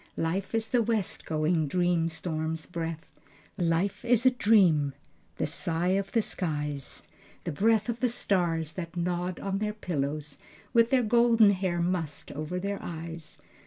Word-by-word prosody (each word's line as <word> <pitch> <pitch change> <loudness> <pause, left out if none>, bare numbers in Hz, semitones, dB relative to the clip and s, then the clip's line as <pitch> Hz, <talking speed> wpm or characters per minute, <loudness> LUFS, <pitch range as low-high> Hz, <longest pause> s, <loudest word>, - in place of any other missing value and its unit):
Life 180 +7 -1
is 225 0 0
the 245 -2 +3
west 220 -4 -1
going 155 0 +1
dream 175 +1 +1
storm's 160 -1 -3
breath, 165 -1 -5 0.5
Life 175 +3 0
is 240 0 +3
a 255 - +7
dream, 185 - +4 0.4
the - - 0
sigh 170 +2 -1
of 195 +1 0
the 225 -2 +3
skies, 150 -7 -3 0.4
The - - -3
breath 220 +7 +2
of 235 -1 -2
the 250 +1 +2
stars, 170 -8 0
that 170 0 -6
nod 175 +1 -1
on 195 0 -2
their 210 0 -1
pillows 150 -6 -3 0.3
With 230 -1 +5
their 255 -1 +3
golden 230 -1 +5
hair 185 -3 0
mussed 170 -5 -2
over 155 +5 -4
their 200 +1 -3
eyes." 165 -1 -7
180 Hz, 155 wpm, -28 LUFS, 160-210 Hz, 0.5 s, a